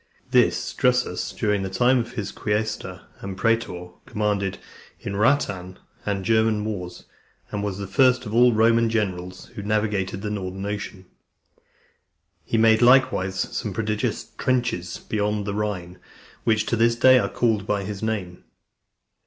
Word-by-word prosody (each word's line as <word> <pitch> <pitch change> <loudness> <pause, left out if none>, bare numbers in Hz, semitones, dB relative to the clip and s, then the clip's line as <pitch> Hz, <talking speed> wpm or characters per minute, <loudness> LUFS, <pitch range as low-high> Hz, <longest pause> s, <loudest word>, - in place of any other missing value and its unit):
This - - +2
Drusus, 125 0 +1
during 105 -3 0
the 95 - -3
time 120 +7 +3
of 120 +1 -4
his 105 -4 -4
being - - -17 0.2
quaestor 105 -5 -4 0.2
and 95 -1 -6
praetor, 105 -5 0 0.2
commanded 100 -2 -1 0.4
in - - -5
the 100 - -3
Rhaetian 100 -7 +1 0.3
and 100 -2 -1
German 110 -2 +2
wars, 90 -5 -5 0.5
and 105 0 -3
was 100 -2 -3
the 100 - -4
first 125 +6 +3
of 105 - -6
all 120 +2 +6
the 115 - 0
Roman 115 +1 +4
generals 90 -5 -3
who - - -6
navigated 105 -2 -1
the 105 - -2
Northern 95 -1 -4
Ocean. 100 -2 -5 1.4
He 115 - -1
made 110 0 +5
likewise 120 -7 +4 0.2
some 105 - -3
prodigious 105 +1 -2
trenches 120 -9 -1
beyond 105 -1 -2
the 100 - -2
Rhine, 90 -4 -3 0.5
which 110 -1 +2
to 115 - 0
this 115 +1 +3
day 130 +2 +6
are 100 -3 -1
called 110 -4 0
by 100 -1 0
his 100 0 -6
name. 100 -6 -3
105 Hz, 155 wpm, -24 LUFS, 95-115 Hz, 1.4 s, all